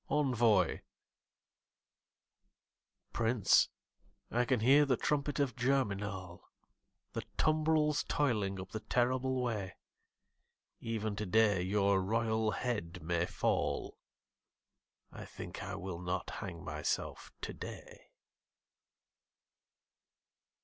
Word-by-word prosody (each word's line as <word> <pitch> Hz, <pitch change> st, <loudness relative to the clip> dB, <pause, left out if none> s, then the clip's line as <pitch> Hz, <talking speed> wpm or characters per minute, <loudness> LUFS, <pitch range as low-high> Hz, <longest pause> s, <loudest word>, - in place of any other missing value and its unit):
Envoi 120 Hz, -, +3 dB, 2.3 s
Prince, 115 Hz, -2 st, +4 dB, 0.6 s
I 120 Hz, +1 st, +2 dB
can 125 Hz, -3 st, +1 dB
hear 135 Hz, +5 st, +6 dB
the 135 Hz, -4 st, +2 dB
trumpet 145 Hz, 0 st, 0 dB
of 135 Hz, -5 st, +1 dB
Germinal, 105 Hz, -8 st, -1 dB, 0.6 s
The -, -, -2 dB, 0.2 s
tumbrils 155 Hz, -1 st, +2 dB
toiling 105 Hz, -9 st, 0 dB
up 95 Hz, 0 st, -8 dB
the 110 Hz, -, -3 dB
terrible 125 Hz, +3 st, +1 dB
way; 105 Hz, -6 st, -3 dB, 1.0 s
Even 110 Hz, -2 st, -2 dB
today 105 Hz, -1 st, +3 dB
your 100 Hz, +1 st, +2 dB
royal 110 Hz, +2 st, +1 dB
head 90 Hz, -5 st, -3 dB
may 85 Hz, +1 st, 0 dB
fall -, -, -1 dB, 1.1 s
I -, -, -8 dB
think -, -, -8 dB
I 100 Hz, +1 st, -5 dB
will 95 Hz, -3 st, -5 dB
not 90 Hz, 0 st, -3 dB
hang 85 Hz, -4 st, -6 dB
myself -, -, -3 dB
today. -, -, -8 dB
110 Hz, 90 wpm, -34 LUFS, 95-130 Hz, 2.3 s, hear